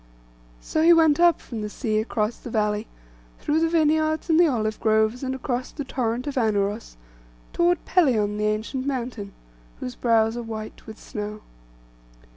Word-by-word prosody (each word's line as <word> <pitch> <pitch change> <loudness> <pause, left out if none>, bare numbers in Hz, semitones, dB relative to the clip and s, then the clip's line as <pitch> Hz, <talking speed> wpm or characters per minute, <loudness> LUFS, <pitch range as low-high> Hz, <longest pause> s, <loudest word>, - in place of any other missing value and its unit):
So 315 - -1
he 335 +2 +7
went 320 -2 +4
up 345 -1 +5
from 230 -3 -7
the 210 - -4
sea 215 -1 -1
across 220 0 -1
the - - -8
valley, 210 -1 -1 0.5
through 305 +2 0
the 325 0 +2
vineyards 315 -1 +1
and 320 - +5
the 345 - +6
olive 220 -6 -1
groves, 220 +2 +2
and 265 -1 -2
across 255 -1 -3
the 290 - -5
torrent 250 -2 -2
of 285 -2 -4
Anauros, 205 - -1 0.6
toward 345 -1 +1
Pelion 220 - +2
the 210 - +1
ancient 225 +5 -2
mountain, 240 -6 -4 0.5
whose 125 - -5
brows 225 -1 +2
are 240 - -3
white 220 -2 -8
with 220 0 -9
snow. 210 0 -6
235 Hz, 165 wpm, -24 LUFS, 215-295 Hz, 0.6 s, he